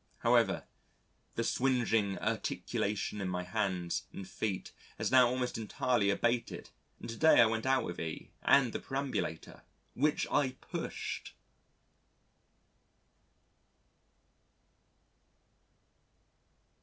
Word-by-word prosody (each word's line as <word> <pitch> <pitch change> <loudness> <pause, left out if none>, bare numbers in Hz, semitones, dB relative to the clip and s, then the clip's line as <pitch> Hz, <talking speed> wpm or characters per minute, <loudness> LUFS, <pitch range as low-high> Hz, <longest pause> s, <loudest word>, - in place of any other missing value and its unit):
However, - - +3 0.7
the 115 - 0
swingeing 115 -6 +1
urtication 105 0 -2
in 95 - -2
my 90 0 -2
hands 90 -3 -2
and 95 - -8
feet 100 -4 -3 0.3
has - - -1
now 130 -1 +7
almost 125 -1 -2
entirely 110 0 +1
abated 115 +4 -1 0.3
and - - -8
to 115 - -5
day 160 +3 +6
I 120 - +9
went 110 +2 -1
out 135 0 +3
with 85 - -5
E 80 -1 -5
and 130 -4 +4
the - - -2
perambulator, 135 - -4 0.3
which 150 +3 +1
I 130 -3 +2
pushed. - - -5
115 Hz, 100 wpm, -32 LUFS, 100-130 Hz, 0.7 s, I